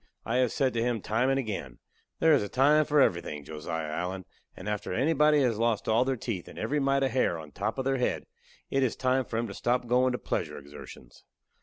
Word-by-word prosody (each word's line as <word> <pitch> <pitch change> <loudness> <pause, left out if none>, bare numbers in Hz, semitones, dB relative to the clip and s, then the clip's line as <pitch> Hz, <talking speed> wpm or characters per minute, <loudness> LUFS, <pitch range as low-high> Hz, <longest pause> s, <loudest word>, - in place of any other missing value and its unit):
I 115 - 0
have 125 -3 +2
said 130 -2 +1
to 115 - 0
him 120 -1 0
time 115 +6 +1
and 135 - +2
again: 105 - -4 0.4
"There 160 -1 +4
is 145 - +4
a 105 - -4
time 150 +4 +4
for 150 0 +2
everything, 80 - 0
Josiah 80 +1 -4
Allen, 90 +3 -3 0.3
and 95 - -8
after 105 0 -3
anybody 150 - +3
has 115 -4 +1
lost 115 -2 0
all 115 +2 +4
their 135 0 0
teeth 110 -7 -5
and - - -12
every 140 +7 -1
mite 135 0 +2
of 135 - +1
hair 120 -8 +1
on 80 -2 -9
the - - -27
top 105 +4 -1
of 130 - -2
their 135 0 +1
head, 125 - -1 0.5
it 135 - +2
is 130 -3 +1
time 130 0 +1
for 115 - -4
'em 115 - 0
to - - -7
stop 125 +1 0
goin' 125 +2 +3
to 125 - -2
pleasure - - -3
exertions." 70 -3 -12
120 Hz, 240 wpm, -28 LUFS, 100-135 Hz, 0.5 s, There